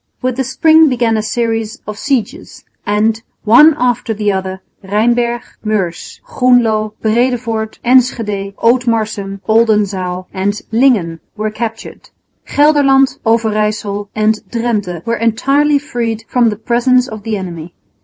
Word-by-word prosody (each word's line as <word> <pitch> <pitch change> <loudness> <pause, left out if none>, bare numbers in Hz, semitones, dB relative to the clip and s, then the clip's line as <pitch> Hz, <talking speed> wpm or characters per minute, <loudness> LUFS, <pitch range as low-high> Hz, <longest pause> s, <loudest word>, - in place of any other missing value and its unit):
With 255 -1 -1
the 265 - 0
spring 315 +4 +4
began 235 -3 +1
a 215 - 0
series 225 +1 -2
of 210 - -6
sieges; 275 - -3 0.2
and, 215 +2 +1 0.2
one 290 +8 +6
after 245 -2 -1
the 210 0 0
other, 190 0 -4 0.2
Rheinberg, 235 +4 0 0.2
Meurs, 200 -6 -3
Groenloo, 240 - +2
Breedevoort, 225 -1 -1
Enschede, 225 -6 +1
Ootmarsum, 220 -5 0
Oldenzaal 205 -5 +1
and 200 +2 -1
Lingen 220 -9 +2 0.2
were 215 0 -2
captured. 225 0 -6 0.4
Gelderland, 280 -2 +3
Overyssel 215 -2 0
and 215 0 +1
Drente 210 -8 -3
were 230 0 -1
entirely 275 +6 +2
freed 235 -6 -3
from 245 -2 +2
the 210 - -3
presence 245 +3 +1
of 215 -1 -8
the 215 0 -3
enemy. 175 -3 -8
225 Hz, 125 wpm, -14 LUFS, 210-245 Hz, 0.4 s, one